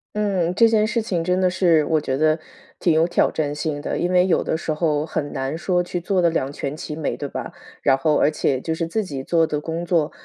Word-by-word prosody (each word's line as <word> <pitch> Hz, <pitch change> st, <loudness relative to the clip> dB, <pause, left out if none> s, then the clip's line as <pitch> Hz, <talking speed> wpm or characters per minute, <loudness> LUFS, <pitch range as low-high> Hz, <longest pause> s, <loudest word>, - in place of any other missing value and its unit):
嗯， 190 Hz, -5 st, 0 dB
这 230 Hz, +3 st, +6 dB
件 215 Hz, -1 st, +3 dB
事 230 Hz, 0 st, -1 dB
情 175 Hz, -6 st, -1 dB
真 180 Hz, +1 st, +1 dB
的 185 Hz, -1 st, +2 dB
是， 170 Hz, -5 st, +3 dB
我 155 Hz, -2 st, +1 dB
觉 130 Hz, 0 st, -2 dB
得 155 Hz, +1 st, +2 dB, 0.4 s
挺 170 Hz, -, +2 dB
有 160 Hz, +1 st, +4 dB
挑 -, -, +2 dB
战 145 Hz, -2 st, -2 dB
性 150 Hz, -1 st, -3 dB
的， -, -, -3 dB
因 175 Hz, +1 st, 0 dB
为 180 Hz, 0 st, +4 dB
有 185 Hz, -, +2 dB
的 160 Hz, -, -1 dB
时 160 Hz, -1 st, -2 dB
候 150 Hz, -2 st, 0 dB
很 150 Hz, -2 st, -3 dB
难 135 Hz, +2 st, -3 dB
说 180 Hz, +1 st, 0 dB
去 175 Hz, 0 st, -4 dB
做 190 Hz, +1 st, 0 dB
得 170 Hz, -2 st, +3 dB
两 140 Hz, -4 st, -1 dB
全 140 Hz, 0 st, -4 dB
其 150 Hz, -1 st, -6 dB
美， 155 Hz, -, -2 dB
对 145 Hz, -2 st, -5 dB
吧？ -, -, -6 dB, 0.3 s
然 135 Hz, -, +5 dB
后 150 Hz, +3 st, +1 dB
而 150 Hz, -, +3 dB
且 135 Hz, -3 st, 0 dB
就 160 Hz, +4 st, -3 dB
是 165 Hz, 0 st, -2 dB
自 215 Hz, +5 st, -1 dB
己 140 Hz, -7 st, -6 dB
做 165 Hz, +1 st, +2 dB
的 150 Hz, -1 st, -3 dB
工 165 Hz, +2 st, -4 dB
作， 165 Hz, -4 st, +1 dB
165 Hz, 275 characters per minute, -22 LUFS, 150-180 Hz, 0.4 s, 这